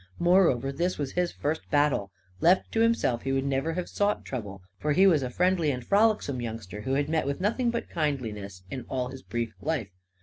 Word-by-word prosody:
Moreover, 170 -8 +3
this 175 +6 -1
was 140 -2 -3
his 180 -1 0
first 155 +2 -3
battle. 145 -9 +2 0.3
Left 180 +3 +3
to 225 - 0
himself, 230 - +2
he 135 - -2
would 135 0 0
never 140 +4 0
have 180 +1 -3
sought 205 0 0
trouble; 100 -7 -6 0.2
for 150 0 +1
he 190 +6 +5
was 165 -7 +5
a 130 - -2
friendly 180 +2 +2
and 125 -3 -3
frolicsome 205 - +2
youngster 110 -3 -6
who 130 +5 -1
had 145 +1 +1
met 155 -2 0
with 140 - -2
nothing 230 +6 +1
but 235 0 -2
kindliness 110 - -3
in 130 -2 -4
all 125 -1 -2
his 135 0 -9
brief 115 -2 -3
life. 145 -10 -1
140 Hz, 205 wpm, -27 LUFS, 125-180 Hz, 0.3 s, he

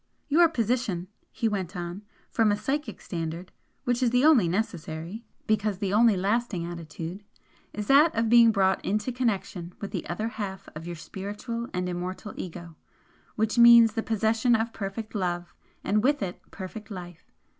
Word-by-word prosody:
"Your 330 +3 +6
position," 230 - -1 0.2
he 230 - -1
went 195 -3 -3
on 175 +2 -5 0.3
"from 225 -2 +3
a 205 - +1
psychic 270 +2 -3
standard, 170 +1 -5 0.3
which 245 0 0
is 250 - +4
the 250 +4 +3
only 265 - +6
necessary, 175 +1 -3 0.2
because 215 -2 +1
the 195 0 -2
only 220 -1 +5
lasting 200 -2 0
attitude, 170 +2 -7 0.5
is 210 - -4
that 290 +7 +5
of 225 0 +1
being 230 0 +7
brought 190 -2 +2
into 210 +5 -1
connection 200 -8 -2
with 200 - -6
the 180 - -4
other 215 +6 -2
half 205 -4 -6
of 165 +2 -7
your 175 - -4
spiritual 205 +7 -6
and 180 0 -2
immortal 180 +3 -5
Ego, 170 -2 -7 0.6
which 220 +2 0
means 235 -1 +8
the 225 - -1
possession 225 +2 +2
of 225 +1 -1
perfect 210 +2 -5
love, 175 -4 -2 0.3
and 210 +2 +1
with 285 -3 +2
it 180 -2 -5
perfect 200 +3 -8
life. 175 -4 -9
205 Hz, 165 wpm, -27 LUFS, 180-230 Hz, 0.6 s, means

